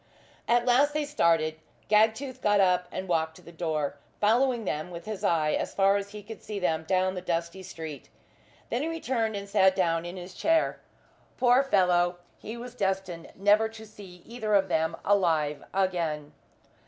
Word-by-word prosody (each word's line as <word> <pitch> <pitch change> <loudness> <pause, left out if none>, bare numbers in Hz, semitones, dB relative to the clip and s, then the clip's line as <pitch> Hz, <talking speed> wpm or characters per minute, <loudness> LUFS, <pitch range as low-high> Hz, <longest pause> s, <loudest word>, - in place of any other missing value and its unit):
At 240 0 +3
last 280 +4 +3
they 305 -1 0
started. 165 - +1 0.3
Gagtooth 220 +5 +2
got 205 -1 +3
up 180 -2 +3
and 190 - -5
walked 160 -2 0
to - - -16
the 170 - -12
door, 155 -4 -2 0.2
following 235 +2 +2
them 155 0 -3
with 170 -1 -9
his 215 -2 -6
eye 160 -5 +2
as - - -2
far 195 0 +4
as 200 0 -2
he 210 0 -9
could 220 +1 -10
see 210 - -6
them 160 -4 -1
down 185 +1 +1
the 180 - -5
dusty 170 +1 -3
street. 160 -7 -8 0.6
Then 240 - 0
he 310 - -1
returned 250 -9 -1
and 200 0 -5
sat 190 -2 +4
down 165 -3 +1
in 175 +2 -7
his 180 +1 -9
chair. 325 - +1 0.6
Poor 250 +1 +5
fellow! 180 -8 +2 0.2
he 225 +3 -7
was 245 +1 -8
destined 190 -6 -3
never 205 +3 +3
to 220 0 -11
see 195 -4 -13
either 220 -3 -1
of 195 -1 +3
them 160 0 0
alive 160 -7 +2
again. 165 -6 -1
190 Hz, 180 wpm, -28 LUFS, 170-220 Hz, 0.6 s, Poor